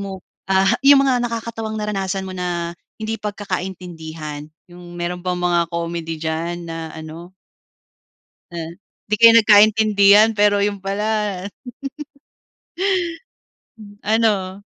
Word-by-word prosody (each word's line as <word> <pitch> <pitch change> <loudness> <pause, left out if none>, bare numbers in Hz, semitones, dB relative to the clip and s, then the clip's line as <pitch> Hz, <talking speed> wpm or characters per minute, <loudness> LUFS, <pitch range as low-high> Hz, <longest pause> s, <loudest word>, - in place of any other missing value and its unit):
mo, 195 -2 -7 0.2
ah, 190 0 +3
yung 275 0 +7
mga 255 -2 +2
nakakatawang 225 -1 -4
naranasan 195 -2 -2
mo 190 - -7
na 175 -1 -3 0.3
hindi 220 +1 -3
pagkakaintindihan. 175 -7 -6 0.2
Yung 175 0 -12
meron 175 +1 -3
bang 180 -1 -1
mga 175 -1 +2
comedy 170 -1 -4
diyan 165 +2 -2
na 165 -1 -6
ano 160 +3 -10 1.2
ah, 165 -1 -5 0.4
'di 215 - +1
kayo 230 0 +9
nagkaintindihan, 215 -1 +6
pero 205 0 +3
yun 205 0 -1
pala 200 +2 -2 3.0
ano? 205 -3 0
190 Hz, 105 wpm, -20 LUFS, 170-210 Hz, 3.0 s, kayo